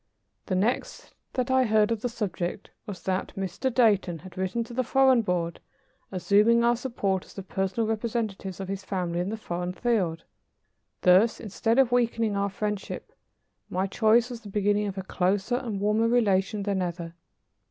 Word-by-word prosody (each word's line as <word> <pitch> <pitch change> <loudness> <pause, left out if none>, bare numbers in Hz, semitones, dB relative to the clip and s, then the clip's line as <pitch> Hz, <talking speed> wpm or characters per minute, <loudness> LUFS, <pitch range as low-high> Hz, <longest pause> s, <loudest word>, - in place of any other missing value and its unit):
The 185 - 0
next 215 +7 -1 0.2
that 255 0 -1
I 260 0 +4
heard 215 -1 +3
of 225 -2 -1
the 245 - -1
subject 200 -5 -4 0.2
was 185 -4 -7
that 190 0 -2
Mr. 195 +7 -2
Dayton 210 -8 +3
had 180 +2 -13
written 190 +5 -1
to 235 - -11
the 255 +2 0
Foreign 260 0 +4
Board, 175 -4 -2 0.5
assuming 210 +5 +4
our 240 0 +4
support 205 -7 -1
as - - -17
the 195 - -6
personal 195 +4 -1
representatives 215 -4 -3
of 190 - -5
his 195 0 -4
family 180 -3 -2
in 180 +2 -1
the 220 - -3
foreign 180 -3 -4
field. 185 -6 0 0.8
Thus, 190 +5 +5
instead 225 +2 -1
of 265 -3 +4
weakening 230 -3 +1
our 200 0 0
friendship, 210 0 -4 0.6
my 185 +2 0
choice 225 +4 +3
was 235 -2 -7
the 210 - -10
beginning 205 +1 +1
of 195 -1 -5
a 190 - -3
closer 190 +6 0
and 230 -6 -4
warmer 210 +3 +2
relation 210 -3 +2
than 195 -2 0
ever. 170 -1 -4
205 Hz, 175 wpm, -27 LUFS, 190-230 Hz, 0.8 s, Thus